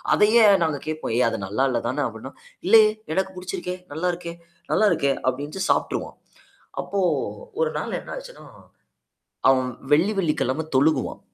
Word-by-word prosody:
அதையே 220 Hz, +2 st, +5 dB, 0.2 s
நாங்க 150 Hz, -3 st, -1 dB
கேட்போம். 155 Hz, -7 st, -3 dB
ஏய்! 125 Hz, -, +4 dB
அது 115 Hz, -, -4 dB
நல்லா 110 Hz, +7 st, +1 dB
இல்ல 120 Hz, -, 0 dB
தானே 140 Hz, +4 st, -1 dB
அப்டின்னா 115 Hz, +4 st, -9 dB, 0.3 s
இல்லயே! 215 Hz, +1 st, +7 dB, 0.3 s
எனக்கு 190 Hz, 0 st, -1 dB
படிச்சிருக்கே! 180 Hz, 0 st, -5 dB, 0.2 s
நல்லாருக்கே! 175 Hz, +1 st, -3 dB, 0.4 s
நல்லா 215 Hz, -, +4 dB
இருக்கே! 140 Hz, -1 st, +2 dB
அப்டின்னுட்டு 145 Hz, +9 st, -2 dB
சாப்பட்டுருவான். -, -, -1 dB, 0.6 s
அப்போ 200 Hz, -, -3 dB, 0.6 s
1 485 Hz, -, +2 dB
நாள் -, -, -3 dB
என்ன -, -, -11 dB
ஆச்சுன்னா? -, -, -11 dB, 1.0 s
அவன் 130 Hz, -1 st, +3 dB, 0.2 s
வெள்ளி 185 Hz, +8 st, +3 dB
வெள்ளிக்கிழமை 155 Hz, -4 st, 0 dB
தொழுகுவான். 150 Hz, +4 st, +2 dB
160 Hz, 140 wpm, -23 LUFS, 135-190 Hz, 1.0 s, இல்லயே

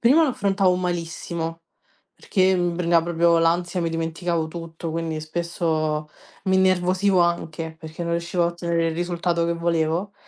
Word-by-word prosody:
prima 270 Hz, +8 st, +5 dB
lo 300 Hz, -, +1 dB
affrontavo 195 Hz, -4 st, +2 dB
malissimo, 170 Hz, -2 st, -3 dB, 0.5 s
perché 190 Hz, -2 st, +2 dB
mi 175 Hz, -1 st, 0 dB
prendeva 170 Hz, -1 st, +3 dB
proprio 170 Hz, 0 st, +3 dB
l'ansia, 175 Hz, +2 st, +1 dB
mi 165 Hz, -1 st, -1 dB
dimenticavo 165 Hz, 0 st, -2 dB
tutto, 165 Hz, 0 st, -6 dB
quindi 160 Hz, -1 st, -3 dB
spesso 155 Hz, -1 st, -1 dB, 0.4 s
mi 190 Hz, 0 st, +3 dB
innervosivo 185 Hz, +1 st, +3 dB
anche, 165 Hz, -2 st, -1 dB
perché 160 Hz, +1 st, -7 dB
non 170 Hz, 0 st, -2 dB
riuscivo 170 Hz, +1 st, 0 dB
a -, -, +3 dB
ottenere 170 Hz, -1 st, -1 dB
il 160 Hz, -, -3 dB
risultato 175 Hz, 0 st, 0 dB
che 170 Hz, -, +1 dB
volevo. 170 Hz, +3 st, 0 dB
170 Hz, 150 wpm, -23 LUFS, 165-180 Hz, 0.5 s, prima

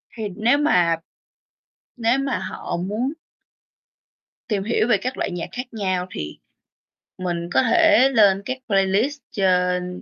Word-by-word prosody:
Thì 225 Hz, -, -5 dB
nếu 235 Hz, +6 st, +3 dB
mà 180 Hz, -, +3 dB, 1.0 s
nếu 235 Hz, +2 st, +2 dB
mà 275 Hz, -1 st, -1 dB
họ 190 Hz, -2 st, -5 dB
muốn 210 Hz, +10 st, -2 dB, 1.4 s
tìm 205 Hz, -4 st, -1 dB
hiểu 220 Hz, +1 st, +1 dB
về 235 Hz, -4 st, +4 dB
các 255 Hz, +6 st, -4 dB
loại -, -, -2 dB
nhạc 175 Hz, -1 st, -5 dB
khác 250 Hz, 0 st, -7 dB
nhau 185 Hz, -4 st, -1 dB
thì 75 Hz, -1 st, -6 dB, 0.9 s
mình 170 Hz, -1 st, -3 dB
có -, -, +4 dB
thể 310 Hz, +2 st, +5 dB
lên 205 Hz, -6 st, +4 dB
các 255 Hz, -, -3 dB
playlist 200 Hz, +8 st, +1 dB
trên 180 Hz, -2 st, 0 dB
205 Hz, 140 wpm, -22 LUFS, 180-250 Hz, 1.4 s, thể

